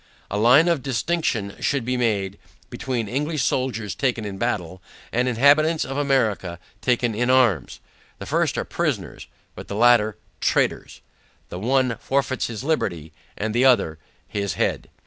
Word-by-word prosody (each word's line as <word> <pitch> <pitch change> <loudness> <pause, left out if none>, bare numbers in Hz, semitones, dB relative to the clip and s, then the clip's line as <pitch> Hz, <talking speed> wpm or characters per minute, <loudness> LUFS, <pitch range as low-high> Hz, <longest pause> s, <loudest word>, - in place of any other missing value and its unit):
A 105 - -1
line 125 +9 +6
of 170 -5 +1
distinction 125 -5 -1
should 140 -5 0
be 125 +1 -1
drawn, 100 -6 0 0.4
between, 120 -4 -3
English 145 +5 -1
soldiers 115 -8 -1
taken 120 -5 -1
in 95 -2 -6
battle, 95 -7 -2 0.3
and 125 +2 +1
inhabitants 145 +6 +4
of 135 - -5
America 115 -11 0 0.2
taken 120 -2 +1
in 120 +4 0
arms. 130 -7 +2 0.4
The - - -8
first - - 0
are - - -1
prisoners, - - -3 0.3
but - - -10
the 100 - -5
latter 115 -2 +4 0.2
traitors. - - 0 0.5
The 90 - -6
one 125 +2 +1
forfeits 135 -1 -1
his 115 0 -6
liberty, 85 - -2 0.2
the 110 +4 0
other 100 -12 +3 0.3
his 100 -3 -3
head. - - -1
120 Hz, 145 wpm, -23 LUFS, 105-135 Hz, 0.5 s, line